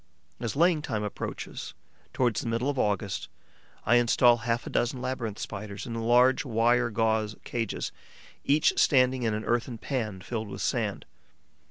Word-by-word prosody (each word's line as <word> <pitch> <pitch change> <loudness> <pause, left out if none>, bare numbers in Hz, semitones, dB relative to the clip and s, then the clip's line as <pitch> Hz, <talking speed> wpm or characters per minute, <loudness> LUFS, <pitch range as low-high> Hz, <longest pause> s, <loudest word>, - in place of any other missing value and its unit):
As 120 0 -3
laying 165 +1 +3
time 110 -7 -3
approaches, 105 - -6 0.4
towards 120 -5 +1
the - - -5
middle 115 +5 0
of 135 - -4
August, 100 -2 -1 0.6
I 120 - +5
instal 120 0 +5
half 115 +1 -2
a - - -6
dozen 120 +2 0
Labyrinth 120 -5 -3
Spiders 100 0 -6
in 120 - -5
large 120 +3 +4
wire 120 0 +2
gauze 110 -1 0
cages, 115 -4 -3 0.5
each 150 +2 +3
standing 130 -2 +4
in 110 -3 0
an 110 - -4
earthen 120 0 -1
pan 110 -7 -3
filled 110 +2 -4
with 100 - -6
sand. - - -1
115 Hz, 155 wpm, -28 LUFS, 110-125 Hz, 0.6 s, I